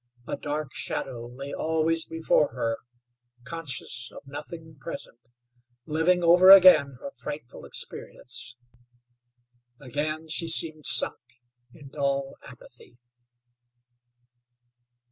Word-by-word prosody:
A - - -3
dark 150 -2 -4
shadow 120 -3 -4
lay 135 +3 -8
always 160 +1 0
before 165 -2 +1
her, 115 -2 -1 0.7
conscious 130 -4 -4
of - - -12
nothing 160 +3 -9
present, 120 -2 -8 0.6
living 165 +3 +2
over 175 +2 +7
again 180 -9 +9
her 185 - -7
frightful 145 -8 -8
experience. 125 - -7 1.2
Again 155 +4 -3
she 165 +1 -2
seemed 160 -2 +1
sunk - - 0 0.5
in 145 0 -13
dull 140 0 -1
apathy. 120 -1 -15
150 Hz, 95 wpm, -27 LUFS, 135-165 Hz, 1.2 s, again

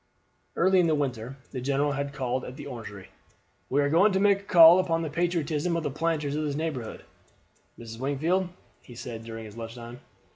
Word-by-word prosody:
Early 185 +1 +4
in 175 - +3
the 155 - +2
winter 130 -3 -3
the 130 - -5
general 140 +2 0
had 140 0 -3
called 130 -2 -2
at 125 - -8
the - - -8
Orangery. 110 -7 -9 0.6
"We 145 +2 +2
are 140 - +1
going 190 +6 +5
to 190 - +2
make 200 0 +4
a - - -16
call 170 -1 +8
upon 165 -3 0
the 155 - -4
patriotism 170 -1 -1
of 165 - -3
the 145 - -2
planters 150 -1 -1
of 155 - -1
this 145 -2 -2
neighborhood, 145 -7 -4 0.7
Mrs. 115 -1 -9
Wingfield," 160 +8 0 0.3
he 120 - -14
said 115 -1 -7
during 115 -2 -8
lunch 115 0 -7
time. 120 0 -10
145 Hz, 195 wpm, -27 LUFS, 125-165 Hz, 0.7 s, call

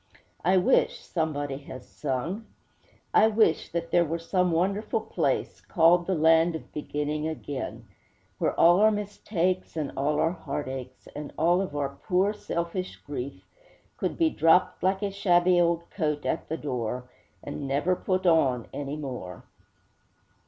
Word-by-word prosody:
'I 185 +2 +4
wish,' 180 - +2
somebody 145 -5 -2
has 130 -3 -10
sung 155 - -3 0.7
I 220 - +6
wish 215 -7 +2
that 170 0 -3
there 175 - +5
were 165 +1 -2
some 180 +2 0
wonderful 200 +6 0
place - - -1
Called 170 +1 +3
the 190 - +1
Land 160 +1 +4
of 160 - -9
Beginning 150 +1 -2
Again, 145 -4 -5 0.5
Where - - 0
all 175 +2 +6
our 215 +1 +6
mistakes 195 -4 -2
and 150 -3 -2
all 145 +2 0
our 165 - +2
heartaches 130 -6 -6
And 150 -1 -6
all 175 +3 +3
of 185 -7 -4
our 140 -1 -1 0.2
poor, 190 +3 +2
selfish 180 -2 -4
grief 140 -1 -7 0.5
Could - - -2
be 330 -2 +3
dropped, 165 - +3
like 190 +2 +1
a 200 - -1
shabby 180 -2 +3
old 170 0 +1
coat, 150 -5 -2
at - - -2
the 160 - -2
door, 125 -3 -3 0.4
And 140 - -5
never 145 +7 +1
put 185 +1 -1
on 135 -9 +3
any 145 0 -4
more. 125 - -6
165 Hz, 150 wpm, -27 LUFS, 145-185 Hz, 0.7 s, I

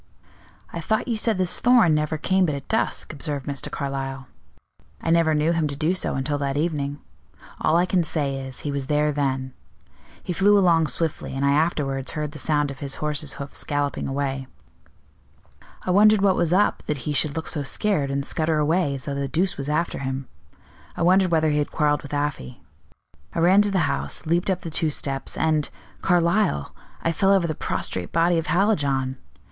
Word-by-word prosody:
"I 170 - -4
thought 220 +10 0
you 235 - 0
said 220 -1 0
this 185 -1 +1
Thorn 240 -9 +5
never 150 +1 0
came 185 +3 +2
but 150 - -1
at 140 - -8
dusk," 220 -6 -1
observed 145 -2 -4
Mr. 140 -2 -3
Carlyle. 135 -1 -4 0.7
"I 165 - -1
never 165 -2 +3
knew 150 +2 +2
him 165 -2 +1
to 140 - -3
do 155 +5 +1
so 185 - -1
until 145 +2 -1
that 140 0 -1
evening. 145 -3 -1 0.6
All 160 - +3
I 175 - +3
can 185 -1 +1
say 145 -4 -1
is, 130 -1 -6
he 145 - -3
was 140 -2 -3
there 150 0 +2
then. 135 -2 -2 0.7
He 180 - -3
flew 205 +3 +4
along 170 -5 +4
swiftly, 150 0 -2
and 135 +1 0
I 140 - +4
afterwards 140 -3 0
heard 150 -1 -3
the 150 - -9
sound 145 -1 0
of 135 - -10
his 140 -1 -2
horse's 150 -1 -2
hoofs 140 0 -4
galloping 145 -1 -2
away. 135 -1 -2 1.4
I 185 - -1
wondered 210 +1 +5
what 195 -2 +4
was 170 -2 +1
up 200 +3 +2
that 140 -5 -3
he 150 - -1
should 145 0 +1
look 160 - -4
so 150 - -1
scared, 145 +1 0
and 140 0 -2
scutter 155 0 0
away 150 -1 +1
as 130 - -7
though 140 - -3
the 140 0 -2
deuce 175 +7 0
was 140 +1 -5
after 165 +3 -1
him; 135 -1 -4 0.7
I - - 0
wondered 185 +1 +4
whether 160 -2 +2
he 150 - +1
had 145 - -1
quarreled 150 -1 +1
with 145 - -10
Afy. 145 - -3 0.8
I - - 0
ran 185 +4 +6
to 205 - +1
the 190 -4 +1
house, 140 0 -2
leaped 170 +4 +1
up 185 -1 0
the 165 - -6
two 160 0 +1
steps, 135 -2 -2
and 155 -2 +1 0.3
Carlyle 170 - +1 0.3
I 165 - +2
fell 195 +4 +2
over 195 -3 +4
the 160 - -1
prostrate 90 - -3
body 170 +1 +3
of 165 - -5
Hallijohn! 140 -9 +1
150 Hz, 200 wpm, -24 LUFS, 140-170 Hz, 1.4 s, ran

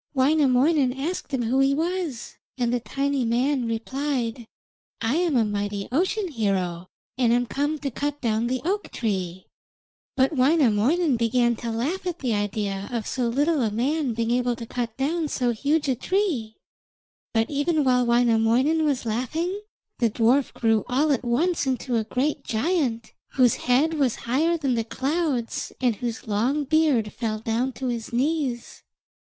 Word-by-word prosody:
Wainamoinen 275 0 +3
asked 320 +1 -3
him 260 -3 0
who 245 +4 +1
he 270 +1 +3
was, 330 -5 -3 0.2
and 240 -1 0
the 245 - +1
tiny 275 +2 -1
man 245 +2 +1
replied: 235 0 -2 0.5
'I 230 +4 0
am 335 -5 +2
a 225 - +3
mighty 205 -1 -3
ocean 375 - 0
hero, 190 - -1 0.3
and 240 -3 +3
am 245 +1 +2
come 290 +5 -1
to 280 -1 -4
cut 290 +4 -3
down 225 -2 0
the 255 +1 -1
oak 405 +4 -1
tree.' 185 -5 -3 0.7
But 270 +3 +2
Wainamoinen 270 +1 +3
began 235 +1 +2
to 235 - -5
laugh 295 +12 -2
at 350 -2 -2
the 250 -8 -1
idea 205 -1 -2
of 230 -3 -2
so 250 -2 -1
little 290 +5 +1
a 225 - +1
man 255 +4 -1
being 230 0 -1
able 245 0 +1
to 230 0 -7
cut 235 -1 -4
down 310 +4 0
so 250 -4 0
huge 285 +6 0
a 265 - +3
tree. 265 - -1 0.8
But 225 +2 0
even 295 +2 +1
while 250 -2 +3
Wainamoinen 240 +5 +3
was 280 -5 0
laughing, 315 - -2 0.4
the 235 - +3
dwarf 240 +5 +2
grew 225 -2 +2
all 285 +5 +2
at 265 - 0
once 285 +6 +1
into 255 -1 -1
a 220 - +1
great 260 +6 -1
giant, 235 -3 -1 0.2
whose 250 -4 +4
head 270 +6 +2
was 275 -7 +1
higher 315 +8 +2
than 275 -5 0
the 230 -1 0
clouds, 270 0 -2
and 245 -5 +1
whose 235 0 -4
long 240 +8 +1
beard 280 -7 +2
fell 220 -2 -2
down 225 +4 -1
to 265 - -6
his 235 -2 -4
knees. 260 -1 -1
250 Hz, 165 wpm, -24 LUFS, 230-290 Hz, 0.8 s, whose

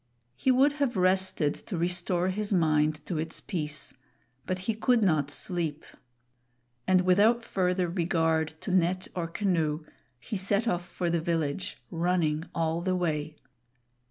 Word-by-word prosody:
He 260 - 0
would 265 +3 +5
have 250 -7 +1
rested 185 -4 +3
to 190 - -6
restore 175 +1 0
his 205 +2 -2
mind 155 -4 +2
to 170 -4 -3
its 160 +1 -3
peace, 155 -5 -4 0.5
but 185 - -1
he 225 - +1
could 230 +1 +2
not 155 -7 +2
sleep; 160 0 -3 1.0
and 185 -1 +5
without 210 +6 +3
further 180 -1 0
regard 165 -2 +1
to 195 - -4
net 185 0 +1
or 170 -2 -2
canoe, 165 -4 -1 0.3
he 120 - -6
set 200 +4 +1
off 175 -3 -1
for 175 -1 -2
the 170 -1 +1
village, 165 0 -2
running 165 -2 0
all 165 0 0
the 185 +1 0
way. 155 -3 -2
175 Hz, 145 wpm, -28 LUFS, 160-190 Hz, 1.0 s, would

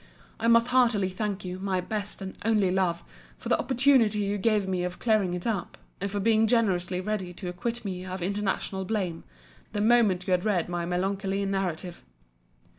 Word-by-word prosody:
I 230 - 0
most 230 +1 +5
heartily 235 -7 +3
thank 200 0 -3
you, 180 0 -5
my 190 -1 -1
best 205 +2 -4
and 190 - -6
only 210 -4 +2
love, 185 -2 0 0.3
for - - -7
the - - +3
opportunity 255 -4 +3
you 200 0 -1
gave 210 -2 +2
me 185 -1 -1
of 180 0 -4
clearing 210 -6 +1
it 175 - -6
up; 210 -7 -2 0.2
and 200 - -1
for 205 +1 -2
being 220 +1 +3
generously 185 -6 +1
ready 190 -2 -3
to 180 0 -6
acquit 230 +6 -4
me 185 -2 -4
of 185 -1 -5
intentional 195 0 -2
blame, 185 -5 -2 0.5
the 210 - -1
moment 215 -5 +3
you - - -2
had 180 -1 +2
read 195 -6 +1
my 175 -1 -2
melancholy 195 +2 -1
narrative. 185 -3 -3
195 Hz, 185 wpm, -27 LUFS, 180-215 Hz, 0.5 s, most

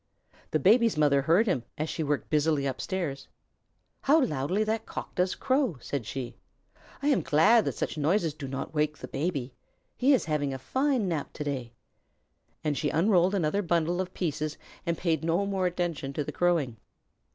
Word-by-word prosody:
The - - +2
Baby's 220 - +4
mother 145 -2 +4
heard 165 +10 +4
him 180 - +1 0.2
as 155 - -1
she 160 - -3
worked 145 -2 -1
busily 150 -2 +2
upstairs. 140 -1 -3 0.7
"How 300 +4 +5
loudly 165 - 0
that 220 +1 -2
Cock - - -6
does 180 +1 0
crow!" 260 - +1
said 125 -3 -4
she. 125 -2 -5 0.7
"I 290 - +3
am 280 - +3
glad 210 +10 +4
that - - -1
such 155 - -3
noises 165 +1 +1
do 145 -2 -7
not 135 +3 -5
wake 150 0 0
the - - -8
Baby. 140 -5 -2 0.4
He 260 +3 +3
is - - -1
having 145 -3 -1
a - - -4
fine 260 - 0
nap 160 -5 -3
to - - -4
day." 130 -5 -4 0.9
Then 150 - +1
she 145 +1 -1
unrolled 185 +2 +3
another 190 +2 +1
bundle 170 0 +1
of 185 0 -6
pieces 155 -3 -2 0.3
and 170 -1 0
paid 160 -4 0
no 170 +4 +1
more 190 -2 0
attention 170 -6 -3
to 150 - -1
the - - -5
crowing. 165 -10 +1
160 Hz, 180 wpm, -28 LUFS, 145-190 Hz, 0.9 s, How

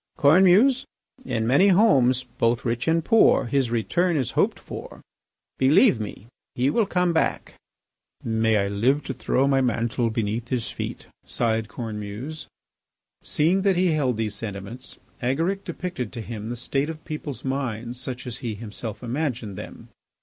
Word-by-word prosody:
"Cornemuse, 190 - +5 0.4
in 110 - -1
many 140 - +5
homes, 135 - +4 0.2
both 115 +1 +1
rich 120 +3 -1
and 165 0 +2
poor, 225 - +5
his 130 0 +1
return 165 +9 +1
is 130 -5 -1
hoped - - +1
for. - - -9 0.6
Believe 135 - +5
me, 105 0 -6 0.3
he 130 +3 +2
will 220 +2 +2
come 180 -2 +1
back." 160 - 0 0.7
"May 110 -1 +2
I 100 -1 +1
live 120 +9 +1
to 135 - -4
throw 135 +2 +1
my 135 -1 +3
mantle 115 -1 0
beneath 110 +1 -2
his 125 -2 -2
feet!" - - -6 0.2
sighed 115 -2 -1
Cornemuse. 110 +6 -6 0.7
Seeing 175 +6 +1
that 195 -1 +3
he 180 -1 +3
held 135 -7 +1
these 110 -2 -2
sentiments, 105 +3 -7 0.2
Agaric 165 +11 0
depicted 170 - -5
to 115 - -5
him 110 -1 -6
the 120 - -4
state 135 +4 -1
of 160 -1 -8
people's 150 -4 -6
minds 125 -3 -3
such 130 -1 -4
as 125 -2 -5
he 115 -4 -4
himself 110 +1 -7
imagined 125 -5 -3
them. - - -10
125 Hz, 155 wpm, -24 LUFS, 115-155 Hz, 0.7 s, Cornemuse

